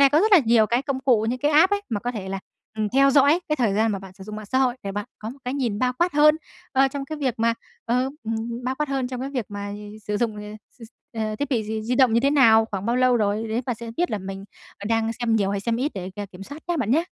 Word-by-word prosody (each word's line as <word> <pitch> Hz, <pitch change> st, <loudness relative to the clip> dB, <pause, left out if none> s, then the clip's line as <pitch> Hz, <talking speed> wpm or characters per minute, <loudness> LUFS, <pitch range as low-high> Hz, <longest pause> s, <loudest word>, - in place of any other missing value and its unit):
nay 275 Hz, -1 st, +7 dB
có 305 Hz, +3 st, +4 dB
rất 435 Hz, +1 st, +2 dB
là 390 Hz, -, +10 dB
nhiều 225 Hz, -1 st, +4 dB
cái 240 Hz, +4 st, +1 dB
công 275 Hz, -2 st, -3 dB
cụ 240 Hz, -5 st, +3 dB
những 250 Hz, +2 st, -1 dB
cái 290 Hz, +3 st, +1 dB
app 325 Hz, +7 st, +5 dB
ấy 405 Hz, -, +2 dB
mà 210 Hz, -3 st, -2 dB
có 245 Hz, +2 st, -2 dB
thể 195 Hz, -4 st, -6 dB
là, 195 Hz, 0 st, -3 dB, 0.4 s
ừm, 215 Hz, -1 st, 0 dB
theo 275 Hz, +4 st, +4 dB
dõi 285 Hz, +5 st, +5 dB
cái 305 Hz, -, +1 dB
thời 230 Hz, -7 st, +1 dB
gian 220 Hz, +1 st, +2 dB
mà 195 Hz, -, -2 dB
bạn 190 Hz, -1 st, -11 dB
sử 190 Hz, 0 st, -12 dB
dụng 215 Hz, 0 st, -7 dB
mạng 215 Hz, -1 st, -8 dB
xã 260 Hz, +5 st, 0 dB
hội, 255 Hz, -2 st, +2 dB
để 195 Hz, -, -4 dB
bạn 205 Hz, +1 st, -3 dB
có 220 Hz, -, -6 dB
một 265 Hz, -, -12 dB
cái 250 Hz, +2 st, -2 dB
nhìn 240 Hz, -7 st, -1 dB
bao 250 Hz, +1 st, +1 dB
quát 345 Hz, +1 st, +2 dB
hơn, 300 Hz, +1 st, +5 dB, 0.4 s
ơ, 270 Hz, 0 st, +4 dB
trong 275 Hz, 0 st, -5 dB
cái 310 Hz, +2 st, -6 dB
việc 260 Hz, -5 st, 0 dB
mà 230 Hz, +1 st, +2 dB, 0.3 s
ờ, 250 Hz, +3 st, +1 dB
ừm, 230 Hz, +2 st, -4 dB
bao 260 Hz, +1 st, -1 dB
quát 300 Hz, +1 st, -2 dB
hơn 270 Hz, -2 st, -1 dB
trong 255 Hz, -1 st, -5 dB
cái 270 Hz, -, -4 dB
việc 255 Hz, -5 st, -2 dB
mà 205 Hz, 0 st, -5 dB, 0.3 s
sử 210 Hz, +1 st, -1 dB
dụng, 220 Hz, -1 st, -1 dB
ờ, 210 Hz, -, -7 dB, 0.4 s
s -, -, -15 dB
s 225 Hz, -, -10 dB, 0.3 s
ờ, 215 Hz, -1 st, -2 dB
thiết 285 Hz, +2 st, -2 dB
bị 235 Hz, -5 st, +1 dB
di 220 Hz, +1 st, -3 dB
di 235 Hz, +3 st, -1 dB
động 250 Hz, -3 st, +4 dB
như 230 Hz, -, +4 dB
thế 275 Hz, -, +2 dB
nào, 225 Hz, -6 st, +6 dB
khoảng 200 Hz, -2 st, -5 dB
bao 240 Hz, +1 st, +1 dB
lâu 255 Hz, -1 st, +4 dB
rồi, 215 Hz, 0 st, 0 dB
đấy, 230 Hz, +3 st, -1 dB
bạn 245 Hz, -, 0 dB
sẽ 230 Hz, 0 st, -7 dB
biết 350 Hz, +1 st, 0 dB
là 215 Hz, -, -1 dB
mình 195 Hz, 0 st, -7 dB, 0.3 s
có 200 Hz, -, -8 dB
đang 225 Hz, 0 st, +1 dB
xem 230 Hz, -1 st, 0 dB
nhiều 195 Hz, -2 st, +1 dB
hay 200 Hz, -1 st, -1 dB
xem 230 Hz, +3 st, -1 dB
ít 275 Hz, +5 st, -1 dB
để 190 Hz, -1 st, -5 dB
k 200 Hz, 0 st, -7 dB
kiểm 180 Hz, +1 st, -10 dB
soát 285 Hz, +9 st, -10 dB
nhá 345 Hz, -, +1 dB
bạn 240 Hz, -8 st, -1 dB
nhá! 315 Hz, +7 st, +3 dB
235 Hz, 315 wpm, -24 LUFS, 215-270 Hz, 0.4 s, là